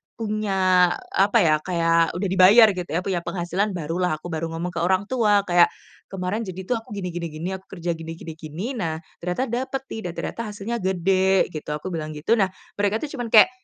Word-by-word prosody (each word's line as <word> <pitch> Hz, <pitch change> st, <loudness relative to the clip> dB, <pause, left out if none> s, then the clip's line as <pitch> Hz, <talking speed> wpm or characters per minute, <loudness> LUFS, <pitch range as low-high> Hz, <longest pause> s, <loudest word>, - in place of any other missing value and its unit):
punya 195 Hz, -5 st, +2 dB, 0.3 s
apa 200 Hz, +4 st, +3 dB
ya, 155 Hz, -2 st, +4 dB
kayak 165 Hz, -2 st, +2 dB
udah 190 Hz, +3 st, -1 dB
dibayar 200 Hz, +5 st, +8 dB
gitu 180 Hz, -2 st, -5 dB
ya, 165 Hz, -, +1 dB
punya 190 Hz, -3 st, -1 dB
penghasilan 185 Hz, +4 st, -1 dB
barulah 170 Hz, +1 st, -1 dB
aku 165 Hz, -, -8 dB
baru 160 Hz, +1 st, -2 dB
ngomong 170 Hz, +2 st, -3 dB
ke -, -, -1 dB
orang 185 Hz, +2 st, +2 dB
tua. 210 Hz, -5 st, +3 dB
Kayak 175 Hz, -1 st, +6 dB, 0.4 s
"Kemarin, 190 Hz, +4 st, -2 dB
jadi 185 Hz, 0 st, -6 dB
tuh 250 Hz, -, +1 dB
aku 225 Hz, -, -17 dB
gini 180 Hz, -3 st, -4 dB
gini 170 Hz, -1 st, -3 dB
gini, 160 Hz, +4 st, -5 dB
aku 190 Hz, -, -11 dB
kerja 170 Hz, +1 st, -1 dB
gini 165 Hz, 0 st, -7 dB
gini 165 Hz, -, -7 dB
gini, 155 Hz, +5 st, -6 dB
nah 165 Hz, -8 st, -2 dB, 0.2 s
ternyata 180 Hz, +8 st, -2 dB
dapet 260 Hz, +2 st, -2 dB
nih 220 Hz, -, -4 dB
dan -, -, -13 dB
ternyata -, -, -4 dB
hasilnya 210 Hz, +3 st, -4 dB
gede," 190 Hz, +1 st, +2 dB
gitu 155 Hz, -2 st, -7 dB
aku 150 Hz, +5 st, -6 dB
bilang 155 Hz, -2 st, -4 dB
gitu. 150 Hz, +10 st, +1 dB
Nah 195 Hz, -, +4 dB, 0.3 s
mereka 205 Hz, +2 st, +1 dB
itu 290 Hz, -2 st, -5 dB
cuman 240 Hz, -, -2 dB
kayak, 215 Hz, -, +8 dB
185 Hz, 205 wpm, -23 LUFS, 170-205 Hz, 0.4 s, dibayar